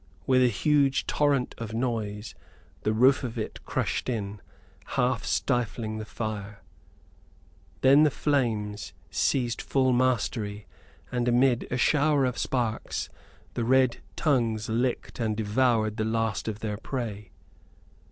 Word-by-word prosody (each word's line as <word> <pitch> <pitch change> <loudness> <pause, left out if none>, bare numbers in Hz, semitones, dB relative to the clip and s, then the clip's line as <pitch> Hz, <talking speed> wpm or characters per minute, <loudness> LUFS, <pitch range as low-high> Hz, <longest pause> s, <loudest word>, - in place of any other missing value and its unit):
With 130 -1 +4
a 125 - +6
huge 140 +4 +2
torrent 145 -4 +1
of 110 -1 -5
noise 110 -4 -2 0.5
the 110 - +1
roof 130 +6 +4
of 120 -1 -4
it 110 - -5
crushed - - -1
in, 105 -4 -3 0.6
half - - +1
stifling 110 -2 -1
the 110 - -5
fire. 105 -2 -5 1.2
Then 135 +3 +7
the 155 - +6
flames 110 -9 -1 0.2
seized 120 -4 0
full 130 -2 +2
mastery; 115 -4 0 0.5
and 125 -1 0
amid 120 0 +3
a 125 - -1
shower 145 +1 +3
of 125 -1 -2
sparks, 120 -4 -2 0.4
the 120 - -1
red 130 0 +3 0.2
tongues 115 -8 +1
licked 120 +3 -1
and 110 -2 -1
devoured 110 0 +1
the 110 - 0
last 110 -4 -1
of 110 -1 -4
their 105 -2 -3
prey. 105 -5 -5
115 Hz, 130 wpm, -27 LUFS, 110-130 Hz, 1.2 s, Then